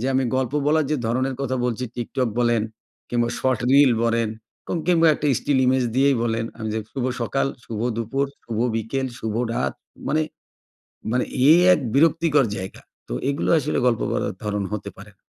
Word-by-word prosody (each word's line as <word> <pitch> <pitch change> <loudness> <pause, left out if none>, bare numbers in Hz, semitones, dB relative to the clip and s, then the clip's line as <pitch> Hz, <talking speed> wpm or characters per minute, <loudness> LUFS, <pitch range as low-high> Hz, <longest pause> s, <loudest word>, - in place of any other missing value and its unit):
যে 125 - -1
আমি 130 0 +2
গল্প 130 -1 -1
বলার 155 0 +3
যে 155 - +2
ধরনের 130 +3 0
কথা 130 -1 -1
বলছি, 125 +1 -1
TikTok 125 +1 -1
বলেন 120 -2 +2 0.5
কিংবা 120 -1 +1
শর্ট 130 -3 0
রিল 140 -2 +6
বলেন 115 -1 +1 0.4
কো - - -4 0.2
কিংবা 165 -2 +5
একটা 150 - -3
স্টিল 140 -2 +1
ইমেজ 130 0 +3
দিয়েই 135 -1 +4
বলেন 115 -1 0
আমি 110 -1 -4
যে 110 - -1
শুভ 130 -2 -3 0.2
সকাল, 135 +4 0 0.2
শুভ 110 -2 -5 0.2
দুপুর, 135 +5 -1 0.2
শুভ 115 -2 -4 0.2
বিকেল, 120 +4 -2
শুভ 110 -1 -3 0.2
রাত, 70 -1 -1 0.3
মানে 155 +1 +2 0.9
মানে 125 +1 +1 0.3
এই 170 - +7
এক - - +1 0.2
বিরক্তিকর 155 -1 +4
জায়গা। 95 0 -7 0.3
তো - - -5 0.2
এগুলো 140 - -1
আসলে - - -1
গল্প 120 -3 +2
বলার - - -1
ধরন 105 -1 -1
হতে 105 - -4
পারে 100 +2 -12
না। - - -52
125 Hz, 180 wpm, -23 LUFS, 115-140 Hz, 0.9 s, এই